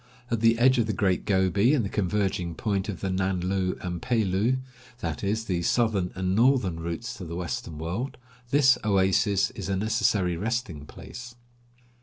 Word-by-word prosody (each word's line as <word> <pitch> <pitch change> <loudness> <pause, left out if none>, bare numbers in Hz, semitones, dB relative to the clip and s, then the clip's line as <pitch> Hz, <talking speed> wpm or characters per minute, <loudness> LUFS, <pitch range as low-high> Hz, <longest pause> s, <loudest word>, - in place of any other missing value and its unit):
At 115 - +1
the 115 +1 +4
edge 130 +2 +4
of 115 - +1
the 110 - -1
Great 95 -5 0
Gobi 100 - +3
and 120 -7 0
the - - -1
converging 95 -4 -1
point 100 0 -1
of 100 - -5
the 95 - -1
Nan 95 0 0
lu 95 0 -1
and 90 -2 -4
Pe 120 -3 +1
lu 100 +7 +1 0.2
— 125 0 -23
that 80 +1 -4
is, 110 +3 -1
the 90 -4 -1
southern 100 -2 +1
and 95 0 -1
northern 115 -8 +3
routes 85 +8 -4
to 95 - -7
the 85 -1 -6
western 85 -2 -4
world 90 - -4 0.2
— 125 -1 -28
this 135 -2 +5
oasis 100 0 +2
is 100 -6 -6
a 95 - +1
necessary 105 -3 +1
resting 105 - -3
place. 125 +8 -10
100 Hz, 190 wpm, -26 LUFS, 90-115 Hz, 0.2 s, this